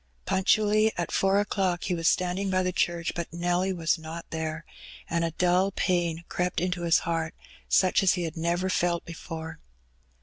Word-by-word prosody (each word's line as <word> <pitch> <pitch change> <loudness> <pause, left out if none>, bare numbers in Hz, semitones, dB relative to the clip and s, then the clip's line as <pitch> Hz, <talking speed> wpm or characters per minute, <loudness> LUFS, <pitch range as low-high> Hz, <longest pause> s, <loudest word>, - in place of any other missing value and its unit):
Punctually 215 +3 +3
at 175 - -2
four 195 +1 +3
o'clock 190 -3 0
he 180 - -1
was 165 -1 0
standing 185 +2 +1
by 185 0 +2
the 185 - 0
church, 170 -2 0
but 170 -1 -4
Nelly 175 +2 0
was 165 -2 0
not 160 +1 -7
there, 160 0 -4 0.4
and 170 0 0
a 165 - +1
dull 180 +3 +2
pain 175 -3 0
crept 180 0 -1
into 180 0 -1
his 170 -1 +4
heart, 165 -1 -2 0.3
such 185 -1 +4
as 190 -2 +4
he 180 - -2
had 165 -2 -4
never 170 +3 0
felt 175 -2 0
before. 165 -1 -7
175 Hz, 175 wpm, -27 LUFS, 165-185 Hz, 0.4 s, his